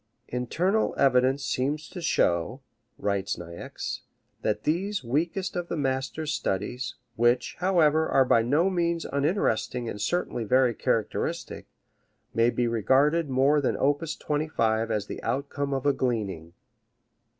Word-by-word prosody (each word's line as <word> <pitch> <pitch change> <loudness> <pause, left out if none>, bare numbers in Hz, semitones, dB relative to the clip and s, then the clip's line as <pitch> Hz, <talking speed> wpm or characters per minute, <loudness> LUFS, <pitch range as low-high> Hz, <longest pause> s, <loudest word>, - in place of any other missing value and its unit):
"Internal 175 - 0
evidence 135 0 +3
seems 145 +4 -1
to 180 - -7
show," 105 - +1 0.4
writes 100 -1 -1
Niecks, 85 0 -6 0.4
"that - - -1
these 185 +4 -1
weakest 165 +10 -1
of 175 -1 -2
the 170 - -3
master's 135 +2 -1
studies 115 +3 -2 0.2
which, 120 +2 +2
however, 160 -4 +3
are 135 - +4
by 115 - +4
no 145 +10 +2
means 170 -2 0
uninteresting 140 - 0
and 105 - -5
certainly 175 -5 -1
very 125 +2 +3
characteristic - - -2 0.7
may 115 +1 +4
be 120 0 0
regarded 135 +8 +2
more 135 +3 +3
than 135 - 0
op. 145 +2 +2 0.2
25 115 -7 0
as 105 -2 -1
the - - -7
outcome 140 +1 -2
of 135 -1 -2
a 145 - +4
gleaning." 100 -11 -2
135 Hz, 130 wpm, -27 LUFS, 115-155 Hz, 0.7 s, are